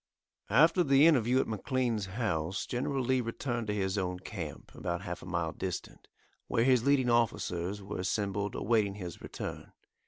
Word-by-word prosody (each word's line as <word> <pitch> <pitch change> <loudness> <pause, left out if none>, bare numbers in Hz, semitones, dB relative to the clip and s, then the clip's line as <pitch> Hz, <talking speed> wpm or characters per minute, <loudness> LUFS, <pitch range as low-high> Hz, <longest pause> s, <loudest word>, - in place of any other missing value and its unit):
After 160 - +5
the 140 0 +5
interview 130 -5 +4
at - - +1
McLean's 115 -1 -1
house 95 -4 -2
General 130 +2 -1
Lee 130 +1 +2
returned 120 0 -3
to 105 - 0
his 95 0 0
own 90 -1 -2
camp, 90 -5 -7
about 85 0 -3
half 90 0 -5
a - - -10
mile 85 -3 -1
distant, 90 +1 -6 0.4
where 115 - +2
his 125 -2 +4
leading 135 -3 +3
officers 100 -4 0
were 100 0 -5
assembled 100 +1 -1
awaiting 105 -2 +1
his 90 -5 -7
return. - - -7
105 Hz, 160 wpm, -31 LUFS, 95-125 Hz, 0.4 s, After